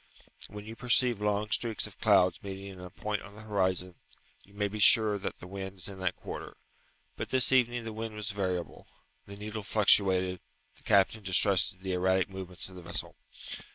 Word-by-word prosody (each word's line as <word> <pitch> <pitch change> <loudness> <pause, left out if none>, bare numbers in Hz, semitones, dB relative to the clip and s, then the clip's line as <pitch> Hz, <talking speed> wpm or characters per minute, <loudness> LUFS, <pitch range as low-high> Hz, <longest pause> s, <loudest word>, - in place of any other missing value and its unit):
When 105 +1 -9
you 110 +1 -8
perceive 125 -2 +2
long 105 0 0
streaks 115 -1 +1
of - - -11
clouds 90 -1 +3
meeting 95 0 -7
in 95 -2 -11
a 90 0 -9
point 105 +3 -4
on 100 0 -12
the 110 - -12
horizon, 95 -3 0 0.5
you 100 - -21
may 105 0 0
be 105 +1 -6
sure 105 0 +5
that - - -5
the - - -10
wind 95 +1 -7
is 90 - -1
in 100 -1 -9
that 95 -2 -1
quarter; - - -8 0.6
but - - -4
this 130 0 +3
evening 120 -2 +2
the 115 -1 -6
wind 110 0 -5
was 105 +1 -3
variable; 95 -3 -4 0.4
the 100 - -9
needle 105 +1 -5
fluctuated; 95 -3 +4 0.4
the - - -18
captain 105 +1 +3
distrusted 95 -1 +3
the 95 -1 -2
erratic 95 +1 +1
movements 95 -1 -5
of 95 - -13
the - - -9
vessel. 85 -2 -1
100 Hz, 190 wpm, -30 LUFS, 95-105 Hz, 0.6 s, sure